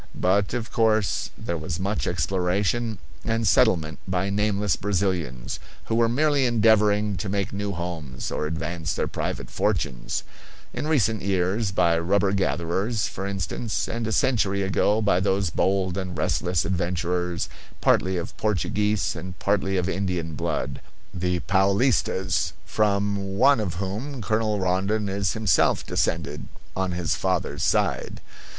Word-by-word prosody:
But, 100 +3 +2
of 115 -2 -4
course, 110 -3 +2
there 85 -1 -3
was 80 +2 -4
much 100 +3 -1
exploration 95 +7 0 0.3
and 115 -1 0
settlement 80 - +3
by 95 +1 0
nameless 105 -1 +1
Brazilians, 85 -11 -2 0.3
who - - -2
were 115 0 +3
merely 140 +1 +3
endeavoring 105 -3 +3
to 95 +3 -3
make 100 0 -1
new 100 0 -2
homes 85 -7 -5
or 75 - -1
advance 80 0 -3
their - - 0
private - - -4
fortunes: - - -1 0.5
in - - -3
recent 110 - +2
years 95 +2 0
by 85 -3 +3
rubber 95 +3 +2
gatherers, 95 - 0
for 95 - -5
instance, 100 +3 -2
and 115 -1 -3
a - - -1
century 105 -5 +2
ago 105 +3 +2
by 100 -3 +3
those 95 -2 +1
bold 95 0 +1
and 90 -3 -5
restless 80 +3 0
adventurers, 90 -1 -1 0.3
partly 95 0 +2
of 85 -1 -5
Portuguese 105 0 0
and 90 +2 -7
partly 95 -1 +1
of 90 -1 0
Indian 90 -4 -2
blood, 75 - -2 0.3
the 90 -1 -1
Paolistas, 95 - +2
from 100 -2 0
one 135 +2 +5
of 95 -5 -2
whom 105 +10 -4
Colonel 110 -1 0
Rondon 95 +3 0
is 95 -1 0
himself 105 -8 +2
descended 75 -2 -1 0.3
on 95 -1 -1
his 85 -2 0
father's 95 -2 -1
side. - - 0
95 Hz, 140 wpm, -25 LUFS, 90-105 Hz, 0.5 s, one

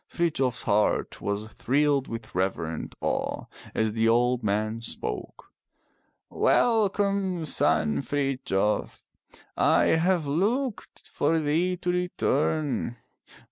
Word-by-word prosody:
Frithjof 150 -7 0
s - - -2
heart 105 +1 +1
was 100 +1 -2
thrilled 140 +1 +1
with 115 -1 -7
reverent 85 -4 -2
awe - - -2 0.3
as 110 -1 +1
the 115 0 +2
old 120 +1 +2
man 110 +2 -1
spoke. - - -6 0.8
Welcome, 200 -5 +1
son 75 - +2
Frithjof, 130 - -1 0.5
I - - +4 0.2
have 175 -1 +2
looked 210 - -2
for 155 +3 +1
thee 165 +4 +1
to 180 0 -1
return. 155 -7 0
140 Hz, 100 wpm, -26 LUFS, 110-175 Hz, 0.8 s, I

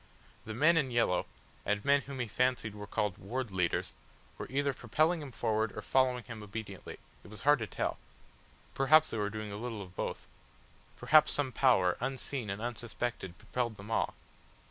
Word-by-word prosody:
The 110 - -5
men 165 +7 +5
in 140 -5 +2
yellow, 115 -7 +2 0.4
and 105 +2 -1
men 140 0 +5
whom 140 -1 -8
he 120 - -2
fancied 120 -1 0
were 105 -1 -8
called 105 -2 -1
Ward 120 +3 -3
Leaders, 90 -1 0 0.5
were - - -4
either 140 +2 +1
propelling 155 +9 +1
him 140 -3 -7
forward 110 -2 -1
or 105 - -4
following 130 0 +2
him 115 -3 -8
obediently; 105 -2 -7 0.3
it - - -13
was 105 -1 -10
hard 145 0 +5
to 110 - -3
tell. - - -2 0.7
Perhaps 155 +4 +5
they 110 - -2
were 105 0 0
doing 110 0 -5
a 100 - -5
little 115 -2 -4
of 90 -1 -14
both. - - -3 0.7
Perhaps 155 0 +5
some 140 -3 0
power 105 -9 +4
unseen 130 -2 -3
and 100 +3 -4
unsuspected 120 -5 -4
propelled 115 +1 -3
them 105 +3 -9
all. 115 - 0
115 Hz, 180 wpm, -32 LUFS, 105-130 Hz, 0.7 s, men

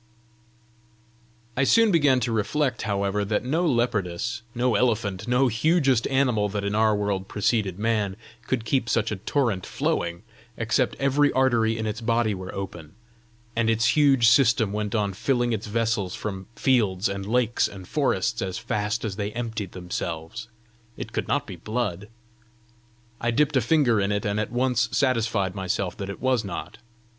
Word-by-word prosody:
I 140 - +2
soon 225 +9 +5
began 145 -7 +4
to 120 0 -1
reflect, 115 +3 0
however, 100 -1 -1
that 105 +1 -1
no 160 +7 0
leopardess, 115 - -1
no 125 0 +1
elephant, 105 -3 0
no 125 +2 +3
hugest 135 0 +2
animal 125 -6 +1
that 100 0 -3
in 100 +1 -1
our 110 0 +3
world 100 -2 -2
preceded 105 -3 0
man, 105 -3 0 0.3
could 120 -4 -1
keep 120 -1 0
such 115 - +1
a 105 - -2
torrent 110 -3 0
flowing, 85 +2 -2 0.3
except 115 +2 0
every 140 +1 +3
artery 120 -4 +2
in 110 - -3
its 110 +2 -3
body 115 -1 +1
were 95 -1 -6
open, 85 -6 -7 0.6
and 115 -1 +1
its 115 +1 +2
huge 135 -6 +5
system 115 -3 +4
went 105 0 -2
on 100 -2 0
filling 120 +3 0
its 110 0 -3
vessels 110 -4 -1
from 95 -3 -5
fields 105 -7 +2
and 100 0 -4
lakes 120 0 +2
and 95 -3 -10
forests 115 -5 0
as 95 -1 -3
fast 110 -1 -2
as 100 -2 -4
they 105 0 -2
emptied 110 -5 -4
themselves: 90 +3 -5 0.5
it - - -7
could - - -2
not - - 0
be - - -8
blood! 105 -4 -3 1.1
I 120 - 0
dipped 140 +5 +2
a 130 - +4
finger 120 -4 +3
in 100 +1 0
it, 100 0 -1
and 105 +1 0
at 110 - -2
once 125 -2 +1
satisfied 115 -8 +1
myself 95 -1 -2
that 100 -2 -5
it 100 - -6
was 130 -3 +2
not. 95 - -6
110 Hz, 165 wpm, -25 LUFS, 100-125 Hz, 1.1 s, soon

